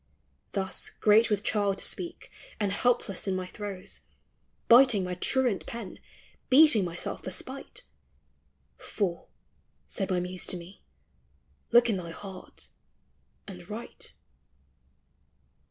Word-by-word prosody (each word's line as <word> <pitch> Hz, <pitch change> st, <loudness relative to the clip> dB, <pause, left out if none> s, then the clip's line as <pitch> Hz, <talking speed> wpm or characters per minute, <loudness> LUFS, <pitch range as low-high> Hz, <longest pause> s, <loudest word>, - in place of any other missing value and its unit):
Thus, 190 Hz, -1 st, -1 dB
great 220 Hz, +2 st, +4 dB
with 210 Hz, -1 st, 0 dB
child 205 Hz, -3 st, +1 dB
to -, -, -1 dB
speak, 345 Hz, -, -2 dB, 0.3 s
and 205 Hz, -2 st, 0 dB
helpless 205 Hz, -3 st, 0 dB
in 190 Hz, -, 0 dB
my 185 Hz, 0 st, -3 dB
throes, 195 Hz, 0 st, -6 dB, 0.7 s
Biting 235 Hz, -5 st, +7 dB
my 180 Hz, 0 st, -3 dB
truant 200 Hz, -2 st, 0 dB
pen, 230 Hz, -5 st, -7 dB, 0.5 s
beating 270 Hz, -6 st, +7 dB
myself 175 Hz, -1 st, -4 dB
for -, -, -4 dB
spite; -, -, -4 dB, 1.0 s
Fool, 180 Hz, -4 st, -3 dB, 0.6 s
said 195 Hz, -4 st, -3 dB
my 185 Hz, -1 st, +1 dB
Muse 180 Hz, +1 st, -2 dB
to 180 Hz, -, 0 dB
me, 175 Hz, +3 st, -12 dB, 0.9 s
look 240 Hz, 0 st, +6 dB
in 215 Hz, -4 st, +1 dB
thy 170 Hz, -2 st, -6 dB
heart, 190 Hz, +2 st, -10 dB, 0.8 s
and 180 Hz, -2 st, -10 dB
write. 220 Hz, +3 st, -7 dB
200 Hz, 120 wpm, -28 LUFS, 185-230 Hz, 1.0 s, Biting